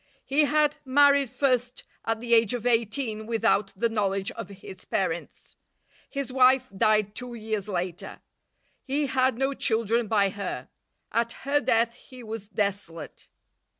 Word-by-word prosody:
He 295 +2 +3
had 300 0 +2
married 280 0 +4
first 250 0 0 0.2
at 225 -1 -1
the 235 -1 0
age 225 0 +4
of 240 -1 -6
eighteen 225 -1 0
without 225 -3 +1
the 220 +5 +1
knowledge 195 -3 -1
of - - -8
his 190 -1 -11
parents. - - -3 0.5
His 275 -2 -4
wife 260 0 +5
died 210 0 +2
two 250 0 -7
years 215 -2 -4
later. 180 -2 -4 0.6
He 285 +2 0
had 260 -2 +1
no 270 +2 0
children 230 -2 +1
by 200 -2 +3
her. 200 -1 -5 0.4
At 235 0 0
her 290 +1 +2
death 230 -2 +2
he 255 0 -14
was 220 -2 -7
desolate. 200 -5 -4
230 Hz, 145 wpm, -26 LUFS, 210-260 Hz, 0.6 s, wife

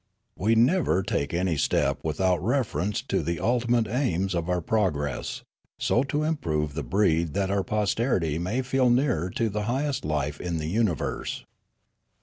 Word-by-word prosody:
We 110 +4 +2
never 120 - +3
take 70 -5 -1
any 85 -2 0
step 70 0 +1
without 90 +3 +1
reference 110 -4 0
to - - 0
the 85 - -1
ulti 120 +6 0
mate 120 -2 +3
aims 95 - 0
of 85 0 -2
our 90 0 +1
progress: 80 -8 -1 0.3
so 120 - +2
to 145 +2 -1
improve 80 - -1
the 75 - -3
breed 80 +2 +1
that 100 -1 0
our 100 -1 +1
posterity 105 - 0
may 105 +10 -1
feel 130 -1 +2
nearer 120 - +2
to 115 +5 -1
the 105 0 -2
highest 135 +2 -1
life 75 -1 -2
in 85 -2 -2
the 75 - -3
universe. 95 0 -1
95 Hz, 160 wpm, -26 LUFS, 80-120 Hz, 0.3 s, never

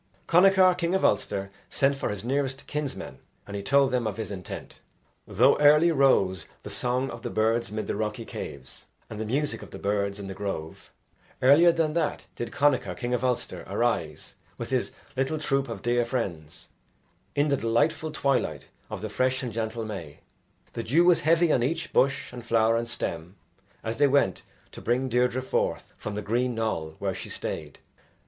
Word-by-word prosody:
Connachar, 185 +1 +6
king 175 +1 0
of 190 - +2
Ulster, 100 -1 0 0.2
sent 140 +1 +2
for 135 - -2
his 105 -1 -4
nearest 135 +2 -1
kinsmen, 145 - -5 0.3
and 100 - -7
he 100 - -3
told 140 +5 +3
them 125 -3 0
of 105 -1 -4
his 110 -3 -4
intent. 95 -3 -8 0.5
Though 120 +8 +4
early 150 +3 +6
rose 100 - +3 0.2
the - - -7
song 125 +2 0
of - - -8
the - - -4
birds 110 +1 +1
mid 105 -1 -3
the - - -2
rocky 110 +2 -3
caves 65 -9 -8 0.2
and 110 0 -5
the 110 - -3
music 145 +6 -1
of - - -10
the - - -9
birds 100 0 -1
in 100 - -6
the 95 - -5
grove, 95 -6 -6 0.5
earlier 150 +6 +7
than 165 -2 0
that 165 -2 -1
did 120 - -5
Connachar, 140 -3 +2
king 120 0 -2
of 125 0 0
Ulster, 125 -2 -1
arise, - - -1 0.2
with - - -6
his - - 0 0.2
little 135 +4 0
troop 135 -3 0
of 115 - -6
dear 120 0 +2
friends, 95 - -4 0.7
in 145 +1 +2
the 140 - +2
delightful 155 +8 +1
twilight 140 -3 -1 0.2
of - - -6
the - - -3
fresh 130 0 0
and 120 -3 -4
gentle 110 0 -3
May; 85 -9 -7 0.5
the 115 - -3
dew 155 +10 +3
was 175 -2 +5
heavy 165 +1 +3
on 125 - +3
each 165 +6 -2
bush 140 -1 +2
and 120 -1 -7
flower 115 -1 +3
and 115 0 -1
stem, 85 -6 -4 0.5
as 115 +2 -4
they 145 - +6
went 135 -9 +2 0.3
to - - -10
bring 130 +3 0
Deirdre 125 +1 +1
forth - - -1
from 105 - -6
the 105 - -3
green 120 +3 0
knoll 80 -9 -2
where - - -2
she - - -7
stayed. - - -5
125 Hz, 185 wpm, -27 LUFS, 105-140 Hz, 0.7 s, earlier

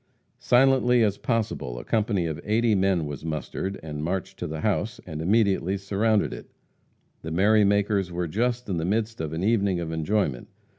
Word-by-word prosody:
Silently 125 -1 +4
as 100 -2 0
possible 105 - -2
a - - -6
company 105 -5 0
of 80 -2 -4
eighty 110 +1 +2
men 95 -4 +2
was 75 0 -6
mustered, 80 +5 -4
and 75 -1 -5
marched 90 +2 -3
to - - -3
the 80 0 -5
house, 105 +1 -1
and 80 -3 -6
immediately 100 0 +2
surrounded 100 +2 +1
it. - - -10 0.7
The 80 - -6
merry 105 +6 +4
makers 100 -2 +1
were 85 0 -2
just 120 +7 -1
in 95 -4 -2
the 80 - -2
midst 110 +3 -1
of 80 -2 -3
an 80 +3 -3
evening 100 -4 +2
of 85 -1 -4
enjoyment. 80 - -1
100 Hz, 180 wpm, -25 LUFS, 80-110 Hz, 0.7 s, Silently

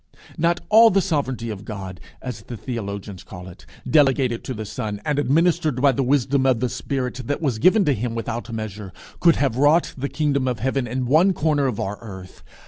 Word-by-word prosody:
Not 170 +2 +1
all 225 +2 +8
the 195 -1 +3
sovereignty 130 -9 -2
of 105 -1 -7
God, 95 -4 -7 0.2
as 125 -5 -6
the 120 +2 -8
theologians 100 -5 -6
call 90 -1 -10
it, 85 -2 -14 0.2
delegated 135 -4 +2
to 130 - -4
the 110 0 -5
Son, 105 -1 -5
and 150 -2 0
administered 155 -1 +2
by 140 +1 +5
the 135 - -1
wisdom 135 0 +2
of 125 -3 +3
the 125 +1 0
Spirit 130 -1 -3
that 145 - -1
was 135 -9 -1
given 190 - +4
to 145 - +3
him 120 0 -3
without 115 +1 -4
measure, 105 -3 -6 0.3
could 170 -2 +5
have 135 -4 0
wrought 150 +5 +3
the 140 +1 -4
kingdom 140 -3 0
of 125 -2 -1
heaven 130 +2 -1
in 125 +2 -2
one 160 +9 +4
corner 150 -4 +1
of 120 -5 -3
our 100 +2 -3
earth. 95 -5 -10
130 Hz, 205 wpm, -22 LUFS, 110-145 Hz, 0.3 s, all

